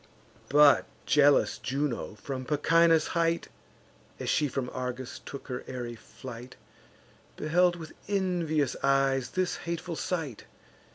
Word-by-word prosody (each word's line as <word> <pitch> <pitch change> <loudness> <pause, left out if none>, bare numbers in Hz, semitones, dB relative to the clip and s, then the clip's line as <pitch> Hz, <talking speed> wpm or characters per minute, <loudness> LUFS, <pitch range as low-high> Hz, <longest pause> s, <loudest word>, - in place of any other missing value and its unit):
But 145 0 +6 0.2
jealous 145 -1 +4
Juno, 135 -5 -2
from 130 +3 -5
Pachynus' 165 +3 +3
height, 170 -1 0 0.7
As - - -1
she 150 - +2
from 130 -2 -3
Argos 125 0 -5
took 140 - -8
her 125 -2 -4
airy 120 -2 -5
flight, 120 +1 -10 0.8
Beheld 175 +3 +3
with 160 -2 -9
envious 175 -8 0
eyes 135 -2 +2
this 185 +3 -1
hateful 170 0 -4
sight. 155 - -3
145 Hz, 115 wpm, -29 LUFS, 130-165 Hz, 0.8 s, But